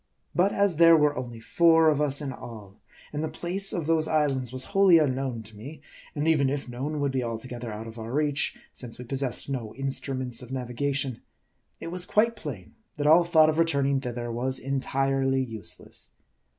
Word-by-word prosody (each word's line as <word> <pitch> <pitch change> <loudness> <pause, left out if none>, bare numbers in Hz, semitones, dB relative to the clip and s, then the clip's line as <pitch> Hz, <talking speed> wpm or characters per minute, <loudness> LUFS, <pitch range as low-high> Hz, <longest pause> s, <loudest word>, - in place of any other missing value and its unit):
But 185 +4 +3
as 200 -5 +1
there 165 0 +7
were 150 -1 +3
only 120 -4 -6
four 165 +6 +4
of 150 -1 +3
us 145 0 +2
in 135 -2 -4
all; 105 -4 -11 0.3
and 150 +1 -2
the 160 - -2
place 195 +3 0
of 170 -4 -2
those 160 0 +2
islands 135 -6 0
was 130 0 -1
wholly 195 -4 +6
un 145 -4 +2
known 130 -4 -3
to 110 0 -13
me; 135 +10 -9 0.4
and 150 +1 -1
even 145 -4 +3
if 140 -1 -3
known, 135 +5 -4
would 140 -1 0
be 130 -1 -1
altogether 120 0 -5
out 105 +1 -6
of 115 0 -9
our 110 +1 -6
reach, 150 +1 0 0.2
since 120 -3 -8
we 125 - -8
possessed 130 0 -3
no 125 -6 -4
instruments 130 -2 -3
of 125 - -11
naviga 130 +2 -2
tion; 135 -4 -3 0.6
it 165 - -6
was 180 0 -2
quite 230 +2 +2
plain 120 - -8 0.2
that 145 - -3
all 160 +3 +7
thought 160 -2 +5
of 155 +1 0
returning 140 -4 +2
thither 120 -2 -4
was 130 +3 -1
entirely 135 0 0
useless. 110 -4 -7
135 Hz, 195 wpm, -26 LUFS, 125-155 Hz, 0.6 s, there